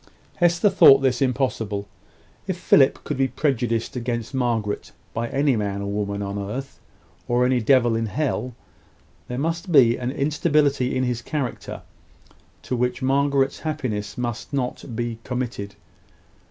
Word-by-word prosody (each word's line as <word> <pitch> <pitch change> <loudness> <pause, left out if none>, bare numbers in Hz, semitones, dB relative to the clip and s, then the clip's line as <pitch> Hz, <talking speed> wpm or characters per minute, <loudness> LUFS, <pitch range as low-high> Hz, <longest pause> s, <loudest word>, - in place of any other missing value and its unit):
Hester 175 +3 +3
thought 135 -7 +8
this 130 -1 +1
impossible. 115 -6 -1 0.6
If - - -2
Philip - - +4
could - - -3
be 135 0 +2
prejudiced 120 -6 -1
against 120 -1 -3
Margaret 115 -5 -1 0.2
by 115 +1 -2
any 140 -1 +2
man 100 -2 -2
or 100 - -3
woman 100 0 -2
on 100 +1 -4
earth, 125 +8 -6 0.5
or 120 +1 +2
any 125 -1 +2
devil 120 0 +4
in 115 0 -1
hell, 125 -2 -2 0.7
there 125 - -4
must 165 +6 -2
be 125 -6 +6
an 125 0 -3
instability 145 -2 +1
in 130 - +1
his 125 -2 -1
character 140 -4 -4 0.8
to 125 - -2
which 125 +2 -1
Margaret's 135 0 +2
happiness 130 -10 -3
must 120 -2 -4
not 125 -2 -3
be 120 0 -3
committed. 120 -5 -4
125 Hz, 140 wpm, -23 LUFS, 115-140 Hz, 0.8 s, thought